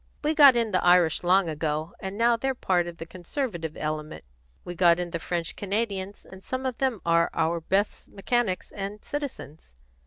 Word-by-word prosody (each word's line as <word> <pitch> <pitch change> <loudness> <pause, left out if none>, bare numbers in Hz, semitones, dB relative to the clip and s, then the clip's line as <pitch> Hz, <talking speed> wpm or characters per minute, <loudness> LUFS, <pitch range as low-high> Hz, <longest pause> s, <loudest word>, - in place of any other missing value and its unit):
We 305 +1 +1
got 285 -4 +8
in 230 -2 0
the 185 - +1
Irish 175 -3 +4
long 185 +1 +3
ago, 155 0 -3
and 190 +1 -6
now 235 +1 +4
they're 265 +3 -2
part 180 -7 0
of 170 -1 -8
the 165 - -7
conservative 175 - -5
element. 155 0 -4 0.4
We 175 - -5
got 170 -1 +4
in 175 -1 -4
the 170 - -3
French 170 0 -3
Canadians, 200 -1 -3
and 190 0 -13
some 260 0 -4
of 255 -2 -3
them 260 -6 0
are 170 0 +3
our 165 +1 +1
best 195 +5 -1
mechanics 200 -2 -2
and 200 +1 -6
citizens. 250 - -7
185 Hz, 185 wpm, -26 LUFS, 170-230 Hz, 0.4 s, got